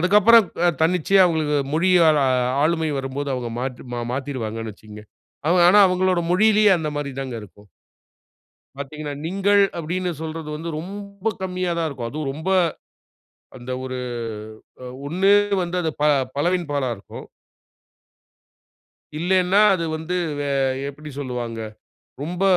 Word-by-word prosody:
அதுக்கப்புறம் 210 Hz, +5 st, +6 dB, 0.2 s
க 175 Hz, -, +4 dB
தன்னிச்சையா 180 Hz, +3 st, +4 dB
அவங்களுக்கு 155 Hz, -3 st, 0 dB, 0.2 s
மொழியால 165 Hz, -3 st, +4 dB, 0.4 s
ஆளுமை 160 Hz, -1 st, +1 dB
வரும்போது 135 Hz, +1 st, -4 dB
அவங்க 120 Hz, -2 st, -4 dB
மாற்றி 130 Hz, -1 st, -5 dB
ம 120 Hz, 0 st, -3 dB
மாத்திருவாங்கணு 115 Hz, -5 st, -4 dB
வைச்சுக்கங்க. 105 Hz, +1 st, -13 dB, 0.4 s
அவங்க 175 Hz, +1 st, +4 dB
ஆனா 205 Hz, +3 st, +6 dB
அவங்களுடைய 180 Hz, -1 st, +1 dB
மொழியிலயே 210 Hz, +2 st, +5 dB
அந்த 155 Hz, -2 st, -3 dB
மாரி 145 Hz, -1 st, -3 dB
தாங்க 130 Hz, -3 st, -5 dB
இருக்கும். 105 Hz, +1 st, -16 dB, 1.1 s
பார்த்தீங்கன்னா, 145 Hz, +1 st, -6 dB
"நீங்கள்" 200 Hz, +3 st, +3 dB, 0.2 s
அப்படின்னு 180 Hz, +2 st, -2 dB
சொல்றது 160 Hz, -1 st, -5 dB
வந்து, 165 Hz, +2 st, -5 dB
ரொம்ப 200 Hz, +3 st, -7 dB
கம்மியா 185 Hz, -1 st, -2 dB
தான் 165 Hz, -1 st, 0 dB
இருக்கும். 125 Hz, -5 st, -5 dB
அதுவும் 150 Hz, 0 st, -4 dB
ரொம்ப 160 Hz, +6 st, -5 dB, 1.1 s
அந்த 120 Hz, +1 st, -9 dB
ஒரு 130 Hz, -1 st, -4 dB, 0.9 s
அ -, -, -7 dB, 0.2 s
ஒண்ணு 190 Hz, +6 st, +3 dB, 0.3 s
வந்து, 175 Hz, +1 st, -4 dB
அது 160 Hz, -, 0 dB
ப 150 Hz, -, +3 dB, 0.3 s
பலவின் 175 Hz, +2 st, 0 dB
பாலா 140 Hz, -3 st, 0 dB
இருக்கும். 100 Hz, -, -11 dB, 1.9 s
இல்லனா 185 Hz, +3 st, +2 dB
அது 170 Hz, -3 st, -1 dB
வந்து 160 Hz, +3 st, -4 dB, 0.2 s
வே 145 Hz, -, -2 dB, 0.4 s
எப்படி 150 Hz, +2 st, -10 dB
சொல்லுவாங்க? 120 Hz, -4 st, -4 dB, 0.6 s
ரொம்ப 175 Hz, +4 st, -4 dB
160 Hz, 130 wpm, -22 LUFS, 140-185 Hz, 1.9 s, அதுக்கப்புறம்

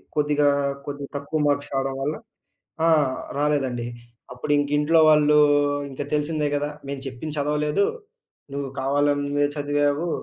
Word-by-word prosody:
కొద్దిగా, 145 Hz, -1 st, +2 dB, 0.4 s
కొద్దిగా 140 Hz, -1 st, -6 dB
తక్కువ 140 Hz, +2 st, -2 dB
మార్క్స్ 145 Hz, 0 st, 0 dB
రావడం 135 Hz, 0 st, -1 dB
వల్ల 150 Hz, +3 st, -1 dB, 0.7 s
ఆ! -, -, +5 dB, 0.5 s
రాలేదండి. 135 Hz, -5 st, 0 dB, 0.5 s
అప్పుడు 125 Hz, +4 st, -3 dB
ఇంకా 145 Hz, 0 st, 0 dB
ఇంట్లో 160 Hz, +2 st, +4 dB
వాళ్ళు 150 Hz, -1 st, +5 dB, 0.5 s
ఇంకా 135 Hz, +2 st, -5 dB
తెలిసిందే 150 Hz, 0 st, 0 dB
కదా! 145 Hz, +1 st, -1 dB, 0.2 s
"మేము 140 Hz, -1 st, -5 dB
చెప్పింది 145 Hz, +4 st, -6 dB
చదవలేదు, 150 Hz, +6 st, +1 dB, 0.7 s
నువ్వు 140 Hz, -1 st, -3 dB
కావాలన్నదె 145 Hz, +1 st, +1 dB
చదివావు." 145 Hz, +3 st, 0 dB
145 Hz, 125 wpm, -24 LUFS, 140-150 Hz, 0.7 s, ఆ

